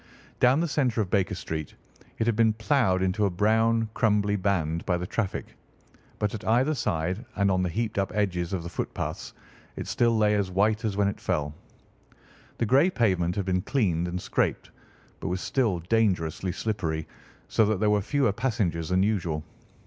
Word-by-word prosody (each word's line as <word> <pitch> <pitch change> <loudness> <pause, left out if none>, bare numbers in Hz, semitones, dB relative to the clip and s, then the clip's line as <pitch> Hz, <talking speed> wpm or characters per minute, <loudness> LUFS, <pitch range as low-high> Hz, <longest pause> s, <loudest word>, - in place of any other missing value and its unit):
Down 125 +4 +5
the 170 - 0
centre 130 -7 0
of 95 -4 -4
Baker 100 0 +1
Street 80 -4 -5 0.4
it 110 - 0
had 115 -1 +2
been 110 0 +4
ploughed 110 -5 +1
into 95 +3 0
a - - 0
brown 110 +4 +2
crumbly 105 -4 +2
band 90 -5 0
by 90 - +2
the 90 - -4
traffic, 100 +1 -3 0.6
but 105 -1 -1
at 110 -1 -6
either 125 +7 +2
side 90 - -1
and 100 -1 +2
on 95 -1 +2
the 90 - 0
heaped 110 +3 -2
up 95 - -1
edges 90 -4 0
of 95 -4 -2
the 85 - -6
footpaths - - -4 0.4
it - - -5
still 115 -1 +2
lay 105 -1 +3
as 100 -2 0
white 105 +4 +1
as 100 -2 -1
when 100 -1 +3
it 100 - -3
fell. 75 -1 -1 1.0
The 115 - 0
grey 135 - +4
pavement 95 - +1
had 100 - -1
been 90 -1 +1
cleaned 90 -9 0
and 90 +1 -3
scraped, - - -1 0.5
but - - -5
was 90 +1 -1
still 105 -7 0
dangerously 90 -3 0
slippery, 85 -6 -2 0.4
so 110 - +3
that 110 -3 0
there 105 0 +3
were 105 -1 +3
fewer 135 +2 +1
passengers 95 -8 -1
than 90 +1 +3
usual. 85 -7 -1
100 Hz, 185 wpm, -27 LUFS, 90-110 Hz, 1.0 s, Down